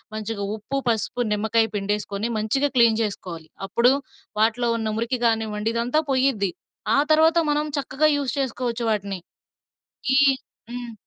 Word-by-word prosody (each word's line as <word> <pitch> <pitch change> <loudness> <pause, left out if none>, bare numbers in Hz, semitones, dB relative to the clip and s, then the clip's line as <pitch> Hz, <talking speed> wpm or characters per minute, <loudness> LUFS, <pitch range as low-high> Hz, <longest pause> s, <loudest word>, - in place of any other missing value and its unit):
మంచిగా 215 -1 -4
ఉప్పు, 245 +6 -3
పసుపు, 230 +2 0
నిమ్మకాయ 220 +2 +2
పిండేసుకొని 205 +1 -2
మంచిగా 270 +7 +1
క్లీన్ 230 -2 +5
జెసుకోవాలి. 180 -6 -4 0.2
అప్పుడు 235 +6 +4 0.5
వాటిలో 235 +2 +2
ఉన్న 220 -1 -2
మురికి 235 +2 -1
కానివ్వండి 220 -1 0
ఇదంతా 245 +6 +1
పోయిద్ది. 255 -8 +2 0.5
ఆ - - +5
తర్వాత 320 +2 +4
మనం 295 +1 +1
చక్కగా 285 +3 +1
యూస్ 280 -1 -2
చేసుకోవచ్చు 245 -2 -2
వాటిని. 200 -3 -2 1.0
ఈ - - +6 0.5
హ్మ్. 245 -1 -6
230 Hz, 130 wpm, -23 LUFS, 210-255 Hz, 1.0 s, ఈ